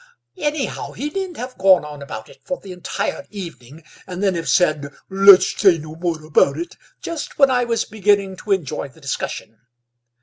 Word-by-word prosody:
"Anyhow, 295 -2 -2
he 295 +3 -4
needn't 380 -2 -4
have 250 +2 -7
gone 185 -5 +5
on 150 -1 -9
about 110 -6 -7
it - - -17
for 275 - -4
the 195 - -10
entire 185 +2 -4
evening 165 - -9 0.2
and 185 +1 -5
then 195 -2 +3
have 165 -1 -3
said, 155 -5 +2 0.2
'Let's 195 0 +7
say 190 -5 +5
no 155 0 -9
more 165 -2 -3
about 145 -2 +3
it' 170 +1 -5 0.3
just 335 -3 -5
when 275 -2 +5
I 245 -1 +2
was 230 -1 0
beginning 200 -2 +1
to 210 - -6
enjoy 155 -7 -1
the 140 +4 -19
discussion. 115 -5 -5
185 Hz, 180 wpm, -21 LUFS, 155-215 Hz, 0.3 s, Let's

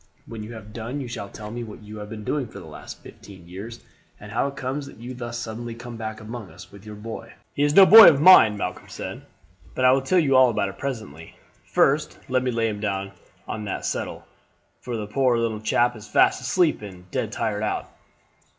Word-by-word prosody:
When 115 -2 -8
you 110 +2 -8
have 105 -2 -11
done 120 +5 -5
you 135 - -5
shall 115 -4 -6
tell 105 +1 -9
me 120 +1 -5
what 110 -1 -10
you 105 0 -9
have 105 0 -8
been 110 -1 -7
doing 140 +2 -2
for - - -12
the - - -10
last - - -11
fifteen 95 -4 -14
years, 105 +7 -9 0.4
and 105 0 -11
how 120 +5 0
it 140 - -7
comes 135 +2 -4
that - - -13
you 120 +3 -8
thus 120 -1 -6
suddenly 115 0 -6
come 120 0 -9
back 110 -1 -6
among 110 -2 -8
us 90 0 -14
with 100 +1 -14
your 105 - -8
boy." 115 +2 -8 0.2
"He - - -3
is 145 +1 +2
no 195 - +10
boy 220 +2 +11
of 140 - +2
mine," 145 - +8
Malcolm 90 -2 -5
said; - - -7 0.5
"but 130 - +1
I 125 - +7
will 135 +1 +3
tell 135 +8 +1
you 140 -6 +3
all 130 -1 +7
about 105 -4 -1
it 95 0 -12
presently. 95 - -6 0.3
First - - +1
let 130 0 +2
me 130 - -1
lay 115 -2 0
him 105 -2 -4
down 100 -2 -3 0.4
on 105 -1 -5
that 100 - -4
settle, - - -4 0.5
for 120 -2 -5
the 105 - -4
poor 125 +3 +1
little 115 -2 -1
chap 120 +2 +2
is 110 -1 -11
fast - - +3
asleep 155 +3 +1
and 90 -3 -11
dead - - -2
tired - - -2
out. - - -2
115 Hz, 230 wpm, -24 LUFS, 105-130 Hz, 0.5 s, boy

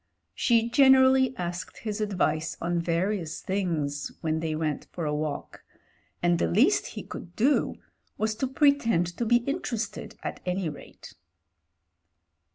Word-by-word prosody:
She 230 -2 +2
gen 265 +2 +6
erally 260 -1 +4
asked 175 -1 -5
his 215 -1 -3
advice 170 -6 0
on 175 +1 -1
various 170 0 -1
things 160 -7 -2
when 160 -1 -1
thej 160 -1 -2
went 155 -2 -2
for 170 - -4
a 150 - -1
walk, 150 -1 -4 0.6
and 175 -1 +3
the - - +2
least 85 - +3
he - - -4
could 175 - -9
do 270 +6 +2 0.4
was 220 0 0
to 265 - 0
pretend 265 - +3
to 235 - -1
be 240 +1 +4
interested 265 -7 -3
at - - -4
any 180 -2 -1
rate. 150 - -12
185 Hz, 145 wpm, -27 LUFS, 160-235 Hz, 0.6 s, gen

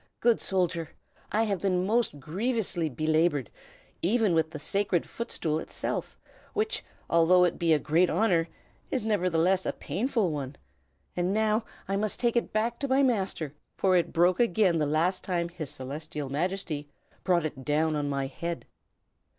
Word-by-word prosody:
Good 235 -1 +3
soldier, 175 -4 0 0.4
I 220 +2 +2
have 200 -5 -1
been 185 -2 +1
most 220 -7 +1
grievously 185 - -1
belabored, 155 - +1 0.5
even 210 +1 +3
with 160 -1 +2
the 155 - -7
Sacred 195 +2 0
Footstool 160 -9 -2
itself, - - -4 0.4
which, 435 +2 0 0.2
although 170 +2 +5
it 175 - +1
be 170 -1 +2
a 155 - +6
great 165 +5 +2
honor, 170 -7 +2 0.4
is 255 -5 -1
nevertheless 185 -3 +2
a - - 0
painful 225 -5 -1
one. 140 -2 -4 0.6
And 180 +2 0
now 220 +1 +2 0.2
must 200 +2 -1
I - - -4
take 235 -1 +2
it 235 - 0
back 230 +2 0
to 280 - -1
my 270 +1 +3
master, 190 - 0 0.2
for 190 -1 +3
it 170 -2 +2
broke 175 +2 +3
again 195 -6 +3
the 150 - +1
last 165 +5 +1
time 175 -2 -1
His 170 -5 -5
Celestial 145 +2 -5
Majesty 155 -1 -2 0.3
brought 175 -3 +2
it 140 -4 -5
down 155 +3 +1
on 145 -1 -1
my 140 -1 -1
head. 170 +5 -5
175 Hz, 160 wpm, -28 LUFS, 155-210 Hz, 0.6 s, a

